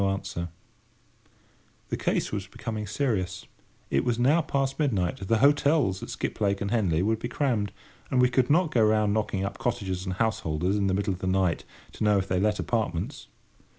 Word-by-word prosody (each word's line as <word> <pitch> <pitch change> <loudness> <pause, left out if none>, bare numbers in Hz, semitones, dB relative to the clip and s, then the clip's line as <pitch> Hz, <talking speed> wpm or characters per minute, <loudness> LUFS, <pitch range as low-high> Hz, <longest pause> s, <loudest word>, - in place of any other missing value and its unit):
No 100 - +2
answer! 95 -3 -3 1.4
The - - -1
case - - -1
was 100 -2 -3
becoming 110 +1 -5
serious. 95 -6 -1 0.5
it 70 - +2
was 120 -1 0
now 140 +8 +4
past 135 -3 -1
midnight. 95 - 0
The 115 - +3
hotels 140 - +3
at - - -7
Skiplake 100 -1 -1
and 100 0 -2
Henley 90 -8 +2
would 110 +2 +1
be 120 - -3
crammed; 115 -5 0 0.4
and 130 - +1
we 125 - +6
could 125 0 +1
not 160 +1 +3
go 115 - +3
round, 105 -1 +3
knocking 105 -3 -1
up 100 0 -5
cottagers 95 -7 -2
and 95 - -2
householders 95 -5 0
in 100 -1 +1
the 95 - +1
middle 100 0 0
of 90 - -8
the 95 - -3
night, 95 -2 +1 0.3
to - - -5
know 105 -1 +4
if 95 0 -1
they 90 -1 +1
let 105 +1 +2
apartments! 110 -8 -2
105 Hz, 190 wpm, -27 LUFS, 95-120 Hz, 1.4 s, we